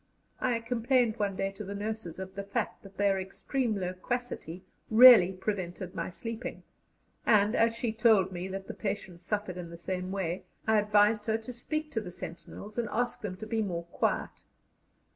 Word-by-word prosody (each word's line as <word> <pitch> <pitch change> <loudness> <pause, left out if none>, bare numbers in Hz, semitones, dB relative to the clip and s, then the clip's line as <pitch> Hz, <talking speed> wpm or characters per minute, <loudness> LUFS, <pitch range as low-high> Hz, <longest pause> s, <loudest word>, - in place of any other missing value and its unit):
I 240 -2 +1
complained 235 0 +1
one 200 -2 -1
day 195 +1 -1
to 195 +2 -8
the 200 +1 -6
nurses 210 -5 -4
of 190 0 -7
the 200 - -4
fact 205 +3 -3
that 195 -1 -14
their 200 -1 +3
extreme 220 +4 -2
loquacity 185 -1 -4 0.3
really 225 -5 +9
prevented 185 -2 -4
my - - -3
sleeping, 230 +6 -6 0.6
and, 210 0 +4
as 230 0 +3
she 230 -1 -1
told 220 -5 +4
me 180 0 -4
that 190 0 -5
the - - -5
patients 190 -4 -5
suffered 205 -4 -2
in 175 -2 -6
the 170 - -9
same 185 +1 -3
way, 185 -2 -2 0.2
I 220 -1 +4
advised 210 +1 +3
her 220 0 +2
to 225 +3 -8
speak 305 +6 -3
to 225 - -1
the 190 - -7
sentinels 200 +5 -8
and 230 - -1
ask 245 +1 -1
them 185 -3 -4
to 220 - -7
be 220 0 0
more 175 -5 -2
quiet. - - -1
205 Hz, 180 wpm, -30 LUFS, 185-225 Hz, 0.6 s, really